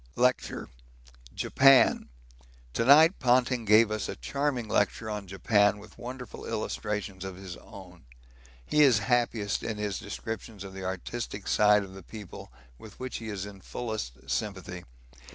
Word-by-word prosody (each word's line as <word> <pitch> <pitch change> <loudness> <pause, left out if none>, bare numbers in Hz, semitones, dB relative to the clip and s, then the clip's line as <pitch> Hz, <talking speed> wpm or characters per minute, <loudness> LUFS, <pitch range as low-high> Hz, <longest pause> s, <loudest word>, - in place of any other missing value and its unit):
Lecture 125 0 +1 0.7
Japan. 135 -1 +5 0.6
To - - 0
night 155 +8 +7
Ponting 125 -2 +2
gave 105 +1 +5
us 110 0 -2
a - - -4
charming 140 -5 -2
lecture 110 +1 0
on 105 -2 -5
Japan 100 +3 +2
with 105 +1 -14
wonderful 125 -1 -8
illustrations 100 -3 -3
of 95 -1 -6
his 95 -1 -8
own. 90 -6 -13 0.6
He 150 - +3
is 135 -6 +6
happiest 115 -2 0
in 110 -2 -4
his 105 -2 -2
descriptions 110 -2 -6
of 95 -1 -9
the 95 0 -7
artistic 100 +2 -5
side 105 -1 +4
of 95 -1 -10
the 95 - -10
people, 100 - -10 0.3
with 110 - -13
which 130 0 -4
he 115 - -7
is 100 -2 -4
in 100 -2 -11
fullest 110 - -5
sympathy. 95 -4 -4
105 Hz, 150 wpm, -28 LUFS, 95-120 Hz, 0.7 s, night